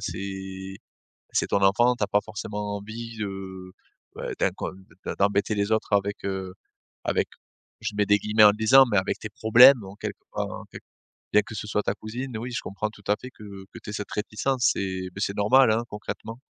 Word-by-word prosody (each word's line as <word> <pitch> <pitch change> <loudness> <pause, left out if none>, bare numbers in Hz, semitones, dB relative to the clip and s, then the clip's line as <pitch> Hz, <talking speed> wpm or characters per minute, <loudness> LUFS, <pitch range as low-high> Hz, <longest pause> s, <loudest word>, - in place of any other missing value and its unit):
c'est 95 0 -6 0.6
c'est - - +1
ton 100 - +1
enfant. 120 +6 +4
Tu 105 - -2
as - - +1
pas 105 - +3
forcément 105 -1 -5
envie, 115 +3 -7
heu, 95 -2 -6 0.4
bah, - - -4
d'incon - - -1 0.3
de - - -3
d'embêter 100 +1 +2
les 100 +1 0
autres 110 -1 0
avec, 100 0 0
heu, 95 -1 -3 0.5
avec - - +1 0.5
je 110 0 -3
mets 105 - +2
des 105 0 +5
guillemets 105 +1 +3
en 105 - +10
le 105 - -7
disant 110 +5 +7
mais 105 - +3
avec 95 - 0
tes 105 - -6
problèmes 115 +4 +7
en 95 +1 -10
quelque 105 - -5 0.2
enfin, - - -3
en - - -13
quelque - - -12 0.5
bien 105 0 +6
que 115 - -10
ce 105 - -5
soit 105 0 0
ta 100 - -1
cousine, 120 +4 -6
oui, 120 +3 -5
je 125 - -2
comprends 105 +2 -3
tout 105 - -17
à 105 - +3
fait 130 - -8
que 105 - -16 0.3
que - - -9
tu - - -7
aies - - -6
cette 105 0 -5
réticence 120 +5 0
et 95 -1 -3
bah, 95 - -7
c'est 100 - -3
normal, 125 +6 +5
hein, 115 +2 +1
concrètement. 115 +2 -7
105 Hz, 215 wpm, -26 LUFS, 100-110 Hz, 0.6 s, en